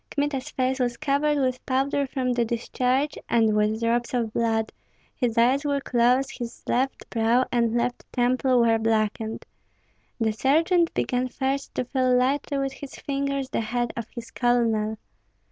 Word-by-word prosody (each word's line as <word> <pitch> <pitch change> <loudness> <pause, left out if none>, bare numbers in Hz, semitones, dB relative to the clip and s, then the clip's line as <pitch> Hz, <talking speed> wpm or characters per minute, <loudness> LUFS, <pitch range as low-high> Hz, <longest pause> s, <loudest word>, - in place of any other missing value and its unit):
Kmita's 285 -1 -2
face 260 -1 -1
was 245 -2 0
covered 295 +1 +1
with 255 -2 -1
powder 275 +2 +1
from 255 -1 -1
the 240 -1 +1
discharge, 250 +5 -1
and 225 -2 +3
with 210 +1 +1
drops 235 +2 0
of 230 -3 -1
blood; 225 -1 0 0.4
his 240 -3 -1
eyes 255 +5 +4
were 285 -1 0
closed, 250 +1 +1
his 240 -1 -7
left 265 +2 -1
brow 235 +2 +2
and 235 -2 +1
left 240 +1 -2
temple 250 0 +2
were 225 -1 +3
blackened. 220 0 -1 0.7
The 220 -1 +1
sergeant 330 - +2
began 250 0 0
first 270 +2 -3
to - - -1
feel 255 -1 +2
lightly 275 +3 0
with 275 -1 -1
his 275 0 -9
fingers 275 -1 -2
the - - 0
head 240 +2 -2
of 235 -2 -5
his 235 -1 -8
colonel. 225 -3 +1
250 Hz, 160 wpm, -25 LUFS, 230-270 Hz, 0.7 s, eyes